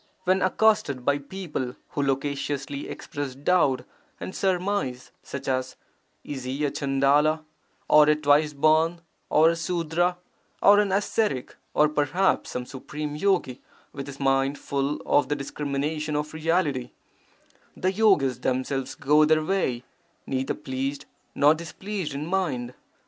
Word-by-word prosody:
When 185 Hz, +1 st, +2 dB
accosted 185 Hz, -, +2 dB
by 140 Hz, 0 st, +2 dB
people 145 Hz, -5 st, -5 dB
who 145 Hz, -, -2 dB
loquaciously 140 Hz, 0 st, -2 dB
express 145 Hz, -3 st, -5 dB
doubt 140 Hz, -4 st, +2 dB, 0.4 s
and 185 Hz, -, -6 dB
surmise, 185 Hz, -9 st, -1 dB
such 140 Hz, -1 st, -7 dB
as, 130 Hz, -1 st, -1 dB, 0.5 s
'Is 135 Hz, -3 st, -6 dB
he 135 Hz, +4 st, -1 dB
a 140 Hz, -, 0 dB
Chandala, 145 Hz, +3 st, +2 dB, 0.4 s
or 150 Hz, 0 st, +6 dB
a 150 Hz, -, +5 dB
twice 150 Hz, 0 st, +3 dB
born, 155 Hz, +3 st, +3 dB, 0.3 s
or 160 Hz, +2 st, +5 dB
a -, -, -2 dB
Sudra, 175 Hz, +1 st, 0 dB, 0.4 s
or 205 Hz, +1 st, +6 dB
an 205 Hz, -2 st, +1 dB
ascetic, 200 Hz, -, 0 dB, 0.2 s
or 150 Hz, -, +5 dB
perhaps 150 Hz, +6 st, +1 dB
some 125 Hz, 0 st, -4 dB
supreme 145 Hz, +3 st, -6 dB
yogi 165 Hz, -7 st, 0 dB, 0.3 s
with 140 Hz, 0 st, -6 dB
his 140 Hz, -1 st, -9 dB
mind 135 Hz, +1 st, +1 dB
full 140 Hz, +1 st, -2 dB
of 145 Hz, -, +2 dB
the 145 Hz, -, +1 dB
discrimination 150 Hz, +2 st, -3 dB
of 150 Hz, +1 st, -2 dB
Reality,' 155 Hz, -5 st, 0 dB, 0.8 s
the 185 Hz, -, +1 dB
yogis 185 Hz, -, +3 dB
themselves 130 Hz, +1 st, -2 dB
go 150 Hz, +2 st, +4 dB
their 155 Hz, 0 st, +3 dB
way, 145 Hz, -10 st, 0 dB, 0.4 s
neither 130 Hz, 0 st, -2 dB
pleased 135 Hz, +2 st, -4 dB, 0.3 s
nor 145 Hz, +2 st, +6 dB
displeased 170 Hz, 0 st, -5 dB
in 145 Hz, +2 st, -3 dB
mind. 150 Hz, -10 st, -1 dB
150 Hz, 135 wpm, -25 LUFS, 135-170 Hz, 0.8 s, or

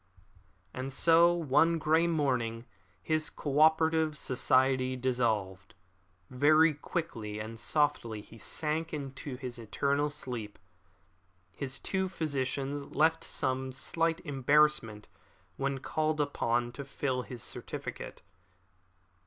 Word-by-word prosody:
And 130 Hz, +1 st, -4 dB
so 165 Hz, +5 st, +5 dB
one 165 Hz, 0 st, +3 dB
grey 160 Hz, +2 st, +3 dB
morning 125 Hz, -8 st, 0 dB, 0.4 s
his 155 Hz, -1 st, 0 dB
co 145 Hz, -1 st, -2 dB
operative 160 Hz, 0 st, +4 dB
society 130 Hz, -1 st, +2 dB
dissolved. 110 Hz, -6 st, -1 dB, 0.6 s
Very 155 Hz, +5 st, +5 dB
quietly 140 Hz, -, -4 dB
and 110 Hz, +1 st, -6 dB
softly 120 Hz, -5 st, 0 dB
he 115 Hz, +2 st, -15 dB
sank 160 Hz, +6 st, -2 dB
into 135 Hz, -1 st, -6 dB
his 125 Hz, -1 st, -6 dB
eternal 140 Hz, +6 st, 0 dB
sleep. 120 Hz, -7 st, -6 dB, 1.0 s
His 135 Hz, -1 st, -3 dB
two 190 Hz, -1 st, -1 dB
physicians 140 Hz, -3 st, -3 dB
felt 160 Hz, +2 st, +3 dB
some 130 Hz, 0 st, -1 dB
slight 165 Hz, +5 st, -1 dB
embarrassment 140 Hz, -6 st, +2 dB, 0.5 s
when 135 Hz, 0 st, -1 dB
called 155 Hz, +3 st, -1 dB
upon 120 Hz, -4 st, 0 dB
to 130 Hz, +4 st, -7 dB
fill 135 Hz, -2 st, -2 dB
in -, -, -12 dB
his 120 Hz, -3 st, -6 dB
certificate. -, -, -6 dB
140 Hz, 110 wpm, -31 LUFS, 125-155 Hz, 1.0 s, so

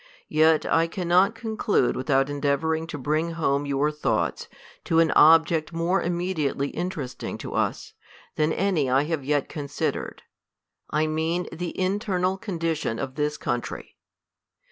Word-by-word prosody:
Yet 155 Hz, 0 st, +4 dB
I 165 Hz, +1 st, +2 dB
cannot 180 Hz, +4 st, +2 dB
con 225 Hz, -1 st, -5 dB
clude 205 Hz, -, +2 dB
without 135 Hz, 0 st, +1 dB
endeavouring 145 Hz, +3 st, -1 dB
to 150 Hz, -, -6 dB
bring 155 Hz, +5 st, -1 dB
home 145 Hz, -3 st, 0 dB
your 140 Hz, +2 st, +1 dB
thoughts 150 Hz, 0 st, -1 dB, 0.4 s
to 165 Hz, -, +1 dB
an 165 Hz, -1 st, +4 dB
object 160 Hz, 0 st, +5 dB
more 170 Hz, +3 st, +1 dB
immediately 170 Hz, -5 st, -1 dB
interesting 155 Hz, -8 st, -5 dB
to -, -, -7 dB
us, -, -, -2 dB, 0.4 s
than 155 Hz, +1 st, +1 dB
any 175 Hz, -7 st, +1 dB
I 135 Hz, +2 st, +3 dB
have 155 Hz, -2 st, -2 dB
yet 145 Hz, 0 st, 0 dB
considered: 145 Hz, -2 st, -4 dB, 0.7 s
I 155 Hz, +1 st, +1 dB
mean 160 Hz, +3 st, -1 dB
the 175 Hz, +1 st, -4 dB
in 190 Hz, +2 st, +1 dB
ternal 190 Hz, -3 st, 0 dB
condition 165 Hz, -, -2 dB
of 130 Hz, +3 st, -4 dB
this 150 Hz, +1 st, -1 dB
country. 120 Hz, 0 st, -4 dB
160 Hz, 145 wpm, -25 LUFS, 145-175 Hz, 0.7 s, object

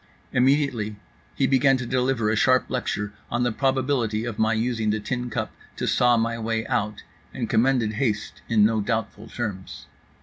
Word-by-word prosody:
Immediately 125 Hz, -5 st, +2 dB, 0.4 s
he 135 Hz, -, +2 dB
began 135 Hz, 0 st, +4 dB
to 125 Hz, -, -4 dB
deliver 125 Hz, -3 st, +1 dB
a -, -, +1 dB
sharp 130 Hz, +4 st, +3 dB
lecture 105 Hz, -5 st, -2 dB, 0.2 s
on 120 Hz, +1 st, 0 dB
the 120 Hz, -, +1 dB
probability 130 Hz, -3 st, 0 dB
of 120 Hz, -4 st, -5 dB
my 110 Hz, 0 st, +3 dB
using 115 Hz, -1 st, 0 dB
the 110 Hz, +1 st, +1 dB
tin 125 Hz, +3 st, -3 dB
cup 105 Hz, -, -3 dB, 0.2 s
to -, -, -3 dB
saw 120 Hz, -1 st, +3 dB
my 115 Hz, +1 st, 0 dB
way 110 Hz, 0 st, -1 dB
out; 105 Hz, 0 st, -2 dB, 0.3 s
and -, -, -2 dB
commended 120 Hz, -2 st, +2 dB
haste 110 Hz, -3 st, -2 dB
in 110 Hz, -3 st, +5 dB
no 110 Hz, 0 st, +2 dB
doubtful 110 Hz, 0 st, -3 dB
terms. 95 Hz, -, -5 dB
115 Hz, 170 wpm, -24 LUFS, 110-130 Hz, 0.4 s, in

